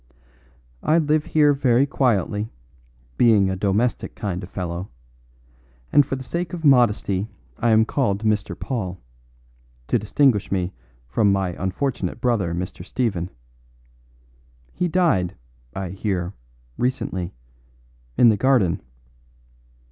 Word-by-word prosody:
"I 160 Hz, -, +3 dB
live 155 Hz, -1 st, +2 dB
here 150 Hz, -2 st, +4 dB
very 135 Hz, -1 st, +3 dB
quietly, 110 Hz, -6 st, 0 dB, 0.7 s
being 105 Hz, -5 st, +4 dB
a -, -, -1 dB
domestic 100 Hz, +5 st, 0 dB
kind 95 Hz, -3 st, -3 dB
of 90 Hz, -, -9 dB
fellow; 90 Hz, 0 st, -4 dB, 1.0 s
and 145 Hz, -, +7 dB
for 135 Hz, -, -3 dB
the 130 Hz, -, -7 dB
sake 170 Hz, +6 st, -4 dB
of 165 Hz, -2 st, -4 dB
modesty 110 Hz, -6 st, +3 dB, 0.3 s
I 120 Hz, -, +2 dB
am 110 Hz, 0 st, +5 dB
called 110 Hz, -6 st, 0 dB
Mr. 105 Hz, -2 st, 0 dB
Paul, 95 Hz, -9 st, -3 dB, 0.9 s
to -, -, +3 dB
distinguish 105 Hz, +1 st, +2 dB
me 95 Hz, -1 st, -1 dB, 0.3 s
from 100 Hz, -, +2 dB
my 95 Hz, -1 st, +1 dB
unfortunate 95 Hz, +4 st, -2 dB
brother 115 Hz, -8 st, +1 dB
Mr. 90 Hz, 0 st, -5 dB
Stephen. 95 Hz, -5 st, -2 dB, 1.4 s
He 180 Hz, -, 0 dB
died, 135 Hz, -, +1 dB, 0.4 s
I 95 Hz, -2 st, -3 dB
hear, 95 Hz, -2 st, -2 dB, 0.5 s
recently 110 Hz, -, -2 dB, 0.8 s
in 120 Hz, -, +7 dB
the 110 Hz, -, +3 dB
garden. 110 Hz, -8 st, +2 dB
105 Hz, 120 wpm, -23 LUFS, 95-130 Hz, 1.4 s, and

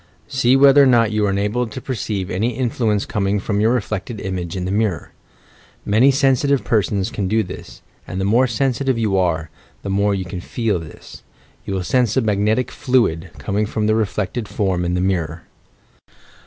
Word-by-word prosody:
See 130 Hz, -2 st, +2 dB
whether 140 Hz, +1 st, +7 dB
or 140 Hz, -, +6 dB
not 115 Hz, -3 st, +4 dB
you 105 Hz, -1 st, +1 dB
are -, -, +1 dB
enabled 105 Hz, +4 st, -1 dB
to -, -, -5 dB
perceive 105 Hz, -7 st, -4 dB
any 110 Hz, +8 st, -1 dB
influence 115 Hz, -5 st, 0 dB
coming 100 Hz, -1 st, -1 dB
from 100 Hz, +1 st, -2 dB
your 110 Hz, +2 st, +3 dB
reflected 110 Hz, -2 st, -3 dB
image 90 Hz, -2 st, -4 dB
in 90 Hz, -, -3 dB
the 95 Hz, -, -2 dB
mirror. 105 Hz, -5 st, -1 dB, 0.7 s
Many 110 Hz, +7 st, +4 dB
sensitive 135 Hz, -1 st, +2 dB
persons 100 Hz, 0 st, 0 dB
can 105 Hz, -5 st, -2 dB
do 110 Hz, +3 st, +1 dB
this, -, -, -10 dB, 0.2 s
and 95 Hz, -, -5 dB
the 95 Hz, -, -1 dB
more 120 Hz, +6 st, +3 dB
sensitive 130 Hz, +2 st, 0 dB
you 110 Hz, -4 st, 0 dB
are, 85 Hz, -4 st, 0 dB, 0.3 s
the 100 Hz, -, -3 dB
more 100 Hz, +1 st, +2 dB
will 100 Hz, -, +1 dB
you 90 Hz, -1 st, -5 dB
feel 110 Hz, -3 st, -1 dB
this. 80 Hz, -2 st, -12 dB, 0.4 s
You 100 Hz, -, -3 dB
will 95 Hz, -, -2 dB
sense 125 Hz, +2 st, +1 dB
a -, -, +4 dB
magnetic 110 Hz, +2 st, 0 dB
fluid, 95 Hz, -10 st, 0 dB
com 100 Hz, 0 st, -2 dB
ing 105 Hz, -, +2 dB
from 110 Hz, 0 st, -2 dB
the 110 Hz, -, +3 dB
reflected 105 Hz, +1 st, -2 dB
form 95 Hz, -4 st, -1 dB
in 90 Hz, +1 st, -1 dB
the 90 Hz, -, 0 dB
mirror. 85 Hz, -4 st, -1 dB
105 Hz, 190 wpm, -20 LUFS, 95-120 Hz, 0.7 s, whether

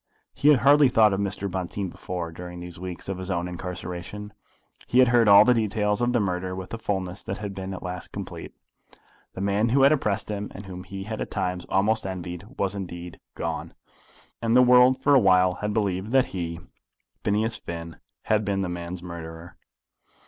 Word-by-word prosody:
He 145 Hz, -, 0 dB
had 140 Hz, -6 st, +6 dB
hardly 140 Hz, +1 st, +6 dB
thought 110 Hz, -4 st, +5 dB
of 95 Hz, -, -1 dB
Mr. 100 Hz, 0 st, -2 dB
Bonteen 95 Hz, +1 st, -3 dB
before, 85 Hz, -1 st, -5 dB
during 90 Hz, +1 st, -8 dB
these 90 Hz, -1 st, -9 dB
weeks 90 Hz, -1 st, -7 dB
of 95 Hz, -1 st, -3 dB
his 95 Hz, +1 st, -6 dB
own 90 Hz, -1 st, -1 dB
incarceration. 90 Hz, +3 st, -6 dB, 0.5 s
He 125 Hz, -, 0 dB
had 130 Hz, -1 st, +7 dB
heard 120 Hz, -2 st, +4 dB
all 100 Hz, 0 st, +9 dB
the 125 Hz, -, +5 dB
details 105 Hz, -1 st, 0 dB
of 120 Hz, 0 st, +2 dB
the 120 Hz, -, +2 dB
murder 90 Hz, -2 st, -2 dB
with 95 Hz, +2 st, -7 dB
a 115 Hz, -, -4 dB
fulness 95 Hz, -3 st, -3 dB
that 95 Hz, -, -5 dB
had 100 Hz, -2 st, -5 dB
been 95 Hz, 0 st, -5 dB
at 95 Hz, -, -6 dB
last 90 Hz, -1 st, -6 dB
complete. -, -, -7 dB, 0.8 s
The 95 Hz, -, -5 dB
man 100 Hz, +3 st, +1 dB
who 135 Hz, +3 st, +4 dB
had 140 Hz, -, +7 dB
oppressed 105 Hz, -9 st, 0 dB
him, 105 Hz, 0 st, -4 dB
and 100 Hz, -, -8 dB
whom 90 Hz, 0 st, -8 dB
he 95 Hz, +1 st, -6 dB
had 110 Hz, +2 st, -5 dB
at -, -, -3 dB
times 90 Hz, -1 st, -3 dB
almost 105 Hz, +2 st, +1 dB
envied, 90 Hz, -1 st, -6 dB
was 100 Hz, -1 st, 0 dB
indeed 90 Hz, -3 st, -7 dB, 0.2 s
gone, -, -, -4 dB, 0.7 s
and 115 Hz, 0 st, +1 dB
the 125 Hz, -, +8 dB
world 125 Hz, +1 st, +6 dB
for 145 Hz, -, +5 dB
awhile 95 Hz, -7 st, +5 dB
had 105 Hz, 0 st, -1 dB
believed 100 Hz, -1 st, -1 dB
that 130 Hz, -1 st, +5 dB
he, 85 Hz, -2 st, -3 dB, 0.6 s
Phineas 110 Hz, +2 st, +1 dB
Finn, 85 Hz, -1 st, -7 dB, 0.3 s
had 110 Hz, 0 st, +2 dB
been 100 Hz, -1 st, -1 dB
the 90 Hz, -, -2 dB
man's 85 Hz, 0 st, -6 dB
murderer! 85 Hz, -1 st, -8 dB
95 Hz, 195 wpm, -25 LUFS, 90-110 Hz, 0.8 s, all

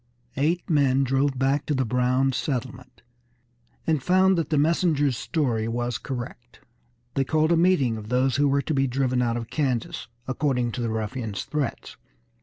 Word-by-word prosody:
Eight 165 Hz, +6 st, 0 dB
men 140 Hz, -4 st, +3 dB
drove 135 Hz, +1 st, +1 dB
back 135 Hz, +2 st, +1 dB
to 150 Hz, -, 0 dB
the 130 Hz, -1 st, +1 dB
Browns' 125 Hz, +2 st, +1 dB
settlement, 130 Hz, -2 st, -4 dB, 0.8 s
and 155 Hz, -4 st, +1 dB
found 185 Hz, +4 st, +4 dB
that 165 Hz, -4 st, -1 dB
the 155 Hz, -, +1 dB
messenger's 150 Hz, -3 st, +2 dB
story 120 Hz, -7 st, -1 dB
was 120 Hz, 0 st, -2 dB
correct. 120 Hz, -2 st, -7 dB, 0.5 s
They 135 Hz, -, +1 dB
called 155 Hz, +4 st, +1 dB
a -, -, +5 dB
meeting 165 Hz, -10 st, +3 dB
of 110 Hz, 0 st, -9 dB
those 130 Hz, 0 st, +2 dB
who 145 Hz, 0 st, +3 dB
were 140 Hz, 0 st, +1 dB
to 160 Hz, -, -2 dB
be 135 Hz, -1 st, +2 dB
driven 130 Hz, 0 st, 0 dB
out 120 Hz, -1 st, 0 dB
of 115 Hz, -1 st, -6 dB
Kansas, 125 Hz, -5 st, -2 dB, 0.2 s
according 130 Hz, -3 st, 0 dB
to 125 Hz, -, -4 dB
the 115 Hz, -, -1 dB
ruffians' 110 Hz, -1 st, -3 dB
threats. 150 Hz, -5 st, -4 dB
135 Hz, 170 wpm, -25 LUFS, 120-150 Hz, 0.8 s, a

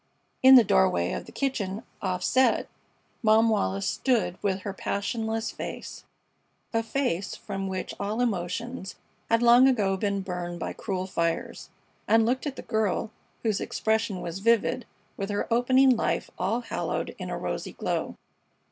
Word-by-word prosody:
In 265 Hz, 0 st, +9 dB
the 245 Hz, -, +9 dB
doorway 85 Hz, -, +2 dB
of -, -, -5 dB
the -, -, -11 dB
kitchen 220 Hz, -6 st, -2 dB, 0.2 s
offset 190 Hz, +7 st, +2 dB, 0.5 s
Mom 220 Hz, 0 st, +5 dB
Wallis 100 Hz, -, 0 dB
stood 215 Hz, -10 st, +1 dB
with 195 Hz, -2 st, 0 dB
her 200 Hz, +1 st, -4 dB
passionless 220 Hz, +3 st, -2 dB
face -, -, -7 dB, 0.7 s
a 225 Hz, -, +2 dB
face 225 Hz, -5 st, -2 dB
from 195 Hz, -1 st, -5 dB
which 190 Hz, -1 st, -4 dB
all 210 Hz, +3 st, -2 dB
emotions 215 Hz, 0 st, -2 dB, 0.3 s
had 230 Hz, +1 st, +3 dB
long 240 Hz, +2 st, +7 dB
ago 205 Hz, -7 st, +2 dB
been 200 Hz, 0 st, -1 dB
burned 175 Hz, -2 st, -5 dB
by -, -, -3 dB
cruel 185 Hz, -3 st, -3 dB
fires 170 Hz, -3 st, -2 dB, 0.4 s
and 225 Hz, +1 st, +5 dB
looked 260 Hz, +5 st, 0 dB
at 275 Hz, -, -4 dB
the -, -, -8 dB
girl, 220 Hz, -1 st, -1 dB, 0.3 s
whose 215 Hz, -4 st, 0 dB
expression 220 Hz, -3 st, -1 dB
was 170 Hz, +2 st, -5 dB
vivid 230 Hz, +2 st, +2 dB, 0.3 s
with 195 Hz, 0 st, -3 dB
her 205 Hz, 0 st, -1 dB
opening 255 Hz, +2 st, +5 dB
life -, -, -1 dB
all 210 Hz, +7 st, 0 dB
haloed -, -, -3 dB
in -, -, -5 dB
a -, -, -3 dB
rosy -, -, -4 dB
glow. -, -, -2 dB
215 Hz, 150 wpm, -27 LUFS, 190-235 Hz, 0.7 s, In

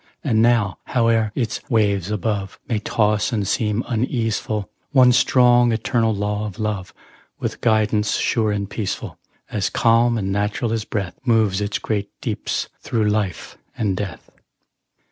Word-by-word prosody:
And 110 Hz, -6 st, +2 dB
now, 115 Hz, -6 st, +2 dB
howe'er 115 Hz, -3 st, +2 dB
its 120 Hz, -4 st, -2 dB
waves 100 Hz, -6 st, +1 dB
above 105 Hz, -2 st, -2 dB
May 115 Hz, -5 st, 0 dB
toss 105 Hz, 0 st, +1 dB
and 105 Hz, -5 st, -1 dB
seem 105 Hz, +3 st, 0 dB
uneaseful, 115 Hz, -3 st, -1 dB, 0.3 s
One 130 Hz, -2 st, +7 dB
strong, 120 Hz, -1 st, +4 dB
eternal 115 Hz, 0 st, +1 dB
law 105 Hz, +1 st, -2 dB
of 95 Hz, -, -9 dB
Love, 105 Hz, -4 st, -3 dB, 0.5 s
With -, -, -4 dB
guidance 110 Hz, -2 st, +2 dB
sure 110 Hz, -2 st, +1 dB
and 100 Hz, -1 st, -2 dB
peaceful, 100 Hz, 0 st, -4 dB, 0.3 s
As 95 Hz, -6 st, 0 dB
calm 115 Hz, +3 st, +3 dB
and 95 Hz, -2 st, -2 dB
natural 105 Hz, +3 st, -1 dB
as 110 Hz, -2 st, -2 dB
breath, 95 Hz, -4 st, -4 dB
Moves 110 Hz, -5 st, +2 dB
its 100 Hz, 0 st, -1 dB
great 105 Hz, -2 st, -2 dB
deeps -, -, -2 dB
through 110 Hz, -3 st, 0 dB
life 105 Hz, -5 st, -3 dB, 0.2 s
and 100 Hz, -4 st, 0 dB
death. 95 Hz, -3 st, -6 dB
110 Hz, 145 wpm, -21 LUFS, 105-115 Hz, 0.5 s, One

